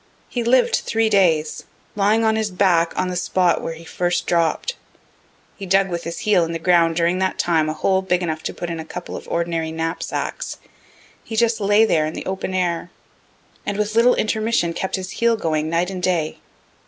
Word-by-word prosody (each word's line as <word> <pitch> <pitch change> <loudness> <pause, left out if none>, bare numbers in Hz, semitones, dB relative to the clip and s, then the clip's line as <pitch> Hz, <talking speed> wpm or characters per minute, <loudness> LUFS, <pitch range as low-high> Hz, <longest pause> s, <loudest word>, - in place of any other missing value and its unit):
He 240 - -2
lived 245 +2 +3
three 225 -1 0
days, 165 -6 +2 0.3
lying 210 +2 +2
on 220 0 +3
his 220 -1 0
back 180 -3 +2
on 185 - 0
the 180 - -3
spot 180 0 +1
where 165 - -4
he 165 - -12
first 175 +1 -1
dropt. 170 - 0 0.8
He 195 - -7
dug 195 +1 +3
with 170 -1 -4
his 170 0 -5
heel 200 -5 +3
in 165 0 -3
the - - -1
ground 165 -1 +3
during 170 +2 +1
that 190 0 0
time 160 -3 +1
a - - -1
hole 190 +4 +1
big 180 -1 0
enough 160 -2 -2
to - - -2
put 175 -1 -4
in 165 - -4
a - - -4
couple 160 - -7
of - - -8
ordinary 165 -1 -1
knapsacks. 165 +1 -3 0.7
He 225 - -6
just 225 0 +2
lay 205 +2 +4
there 155 -7 +2
in 155 - -6
the - - -6
open 190 0 -3
air, 175 -2 -1 0.7
and 205 - -3
with 210 0 -1
little 235 +2 +5
intermission 215 -5 0
kept 190 - -2
his 190 0 -5
heel 235 +2 +1
going 155 -4 -1
night 170 +3 0
and 185 -1 -5
day. 170 -4 0
180 Hz, 205 wpm, -21 LUFS, 165-205 Hz, 0.8 s, little